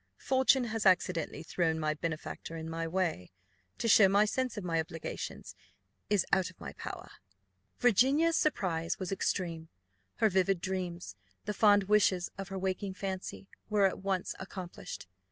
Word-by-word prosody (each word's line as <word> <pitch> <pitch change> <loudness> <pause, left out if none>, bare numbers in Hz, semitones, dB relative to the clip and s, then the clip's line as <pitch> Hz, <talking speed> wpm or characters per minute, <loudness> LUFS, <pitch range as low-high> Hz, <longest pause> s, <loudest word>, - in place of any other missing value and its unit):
Fortune 265 0 +3
has 225 -2 -2
accidentally 180 -4 +1
thrown 165 -1 0
my 155 -1 0
benefactor 160 +1 -5
in 160 0 -6
my 165 0 -3
way. 165 - -1 0.5
To - - -1
show 205 -3 +7
my 200 +2 +5
sense 255 +2 -2
of 205 - -4
my 165 -2 0
obligations 160 - -5 0.6
is 205 -3 +3
out 190 -2 +3
of - - -18
my - - -7
power." - - -8 0.7
Virginia's 270 - +4
surprise 175 - 0
was 185 -1 -4
extreme; 170 -4 -2 0.5
her 220 - +3
vivid 190 -1 +2
dreams, 180 - -4 0.3
the 210 - -2
fond 205 -1 +5
wishes 190 -3 +2
of 195 -1 -6
her 195 -1 -5
waking 190 +1 -2
fancy, 190 0 -5 0.2
were 210 -2 +4
at 190 - 0
once 190 -1 -1
accomplished. 185 - -7
190 Hz, 155 wpm, -31 LUFS, 170-205 Hz, 0.7 s, show